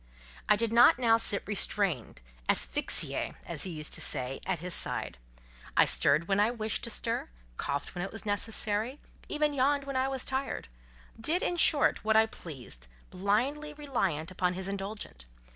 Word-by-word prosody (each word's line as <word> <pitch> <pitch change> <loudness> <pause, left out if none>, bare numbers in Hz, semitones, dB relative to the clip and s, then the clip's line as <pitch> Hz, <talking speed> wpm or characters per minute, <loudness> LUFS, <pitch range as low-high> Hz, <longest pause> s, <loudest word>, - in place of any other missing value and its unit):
I - - +6
did 230 -1 -1
not 240 +1 +6
now 230 -3 +3
sit 215 -3 +3
restrained, 195 - +1 0.3
"asphyxiée" - - +2
(as - - -5
he - - -5
used 155 -3 -3
to - - +1
say) 135 -1 +1
at - - 0
his 175 +2 -1
side; - - 0 0.6
I - - +7
stirred 150 +4 +3
when 195 0 +1
I 210 +2 +3
wished 220 -3 -2
to - - -3
stir, - - -2 0.3
coughed 140 0 -4
when 175 - -4
it 195 - -5
was 220 - -9
necessary, 215 +4 -1 0.3
even 300 -1 0
yawned 280 +1 +1
when 275 -1 -6
I 260 +1 +1
was 270 -1 -3
tired—did, 225 - -4
in 355 - 0
short, 300 -9 +4
what 220 0 +3
I 220 - +6
pleased, 130 - -8 0.2
blindly 255 +11 -1
reliant 195 - -2
upon 180 -1 -1
his 190 +1 -5
indulgence. 195 - -6
205 Hz, 165 wpm, -29 LUFS, 170-255 Hz, 0.6 s, I